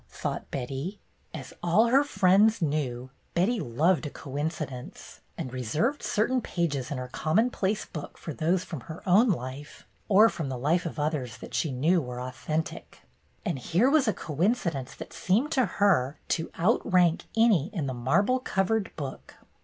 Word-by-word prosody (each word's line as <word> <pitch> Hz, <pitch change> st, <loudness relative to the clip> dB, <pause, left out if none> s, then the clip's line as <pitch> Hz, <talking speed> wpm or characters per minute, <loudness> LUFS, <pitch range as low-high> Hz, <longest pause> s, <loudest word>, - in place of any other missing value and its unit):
thought -, -, -4 dB
Betty. 135 Hz, +9 st, -4 dB, 0.3 s
As -, -, -8 dB
all 175 Hz, +7 st, +4 dB
her 270 Hz, +4 st, +5 dB
friends 210 Hz, -2 st, +4 dB
knew, 135 Hz, -6 st, -2 dB, 0.2 s
Betty 205 Hz, +7 st, +2 dB
loved 155 Hz, +4 st, +1 dB
a -, -, -5 dB
co 140 Hz, -1 st, -10 dB
incidence, 145 Hz, -4 st, -5 dB, 0.2 s
and 130 Hz, -, -5 dB
reserved 150 Hz, -, -1 dB
certain 245 Hz, +4 st, +1 dB
pages 150 Hz, -, -2 dB
in 145 Hz, -, -3 dB
her 125 Hz, 0 st, -4 dB
commonplace 195 Hz, -, 0 dB
book 150 Hz, -, -8 dB
for 160 Hz, -, -6 dB
those 170 Hz, +4 st, +1 dB
from 160 Hz, -, -6 dB
her 160 Hz, -, -10 dB
own 210 Hz, +7 st, +5 dB
life 135 Hz, -, -4 dB, 0.2 s
or 210 Hz, +2 st, +7 dB
from 160 Hz, -10 st, -3 dB
the 130 Hz, -, -3 dB
lives 165 Hz, +7 st, +1 dB
of -, -, -7 dB
others 145 Hz, -6 st, -2 dB
that -, -, -11 dB
she 155 Hz, -, 0 dB
knew 160 Hz, +8 st, +2 dB
were 125 Hz, -2 st, -6 dB
authentic. 140 Hz, +5 st, -4 dB, 0.4 s
And 135 Hz, -, -1 dB
here 200 Hz, -, +2 dB
was 295 Hz, -4 st, +4 dB
a -, -, +4 dB
coincidence 165 Hz, -, -1 dB
that -, -, -9 dB
seemed 235 Hz, +12 st, +1 dB
to 260 Hz, -2 st, +3 dB
her 165 Hz, -8 st, +2 dB
to 165 Hz, -, -1 dB
outrank 180 Hz, -3 st, +3 dB
any 215 Hz, -10 st, +4 dB
in 165 Hz, -8 st, -2 dB
the 130 Hz, -, -2 dB
marble 170 Hz, -, +2 dB
covered 210 Hz, -3 st, 0 dB
book. 140 Hz, -4 st, -7 dB
165 Hz, 165 wpm, -27 LUFS, 135-205 Hz, 0.4 s, or